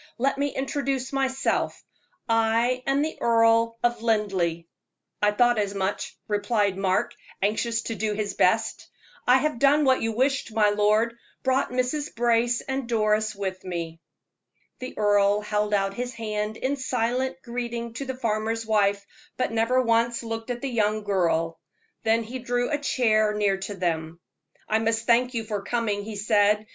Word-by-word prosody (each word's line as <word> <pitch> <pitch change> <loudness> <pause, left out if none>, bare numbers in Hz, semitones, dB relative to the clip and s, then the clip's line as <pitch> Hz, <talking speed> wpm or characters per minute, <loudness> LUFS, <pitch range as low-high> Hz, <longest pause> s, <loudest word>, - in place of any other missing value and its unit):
"Let 275 +3 0
me 285 - +2
introduce 270 -1 -2
myself 270 -1 -1 0.4
I 230 +2 +2
am 275 +1 +2
the 315 - -4
Earl 230 0 +3
of 240 -1 +1
Linleigh." 195 -7 0 0.6
"I 210 - +4
thought 240 +2 +3
as 200 -1 -1
much," 195 +1 -3
replied 205 -1 +1
Mark, 190 -1 0 0.3
anxious 225 +3 0
to 230 - -3
do 215 -1 -1
his 205 -1 -2
best. - - +1 0.4
"I 250 +1 +7
have 280 -3 -1
done 285 +2 +4
what 260 -1 +3
you 225 - 0
wished, 255 0 0
my 210 -1 +4
lord 215 +3 +2 0.3
brought 260 +1 +1
Mrs. 255 +4 -2
Brace 235 0 +2
and 265 -2 -4
Doris 215 -1 +1
with 190 -2 -4
me." 170 -2 -5 0.8
The 255 - -7
earl 205 0 +3
held 210 0 -1
out 195 -1 +1
his 245 +4 -4
hand 215 -1 -3
in 275 +2 -1
silent 260 +1 -1
greeting 235 -1 -4
to 275 +4 -5
the 260 -1 -5
farmer's 225 -1 -1
wife, 205 -2 +1 0.3
but 255 - 0
never 230 +3 +2
once 230 0 +1
looked 225 +1 -5
at 240 -1 -3
the 275 - -2
young 215 -2 +1
girl. 165 -4 0 0.4
Then 225 +1 +2
he 245 +4 -6
drew 245 +1 -1
a 295 - 0
chair 215 -6 +2
near 205 -2 +1
to 195 +1 -6
them. 165 -2 -2 0.5
"I 220 - +2
must 225 0 0
thank 245 +2 +3
you 225 - -1
for 210 -2 -3
coming," 210 -1 -1
he 215 0 -7
said. 210 0 +2
225 Hz, 165 wpm, -25 LUFS, 210-245 Hz, 0.8 s, I